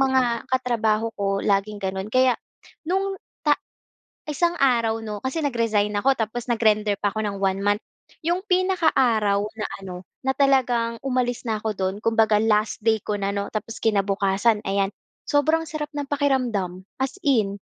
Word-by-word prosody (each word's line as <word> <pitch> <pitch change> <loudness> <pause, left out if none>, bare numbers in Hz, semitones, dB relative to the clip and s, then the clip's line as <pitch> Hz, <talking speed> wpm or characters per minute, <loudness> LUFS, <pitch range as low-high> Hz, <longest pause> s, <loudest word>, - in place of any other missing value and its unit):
mga 260 -3 +2
katrabaho 230 -3 +1
ko 195 0 0
laging 200 +1 +1
gano'n 190 +1 -3
kaya 255 0 +4 0.5
nung 385 +1 0 0.3
ta 295 - +6 0.8
isang 340 +4 +1
araw 230 -4 +3
'no, 210 -1 -4
kasi 265 +5 -1
nag-resign 230 -6 +1
ako 270 +6 +4
tapos 230 +2 -3
nag-render 215 -3 +3
pa 205 - +2
ako 215 0 -2
ng 200 -1 -3
1 195 0 +1
month. 205 +1 +2 0.4
Yung 345 +3 +1
pinaka 370 -2 +2
araw 215 -6 +3 0.2
na 210 - -2 0.2
ano, 185 -2 -6 0.3
na 265 - +2
talagang 245 -4 +2
umalis 250 -2 0
na 220 - +1
ako 220 0 -2
do'n 190 0 -1
kumbaga 225 -2 +3
last 215 -1 +2
day 220 -1 +4
ko 210 -1 -2
na 200 0 -1
'no, 200 0 -2
tapos 220 +1 -5
kinabukasan 200 +1 +2
ayan, 195 0 +1 0.4
sobrang 315 +3 +2
sarap 300 -1 -4
ng 290 - -2
pakiramdam, 240 -11 0 0.2
as 265 +7 -1
in. 215 -8 +2
225 Hz, 160 wpm, -24 LUFS, 205-265 Hz, 0.8 s, ta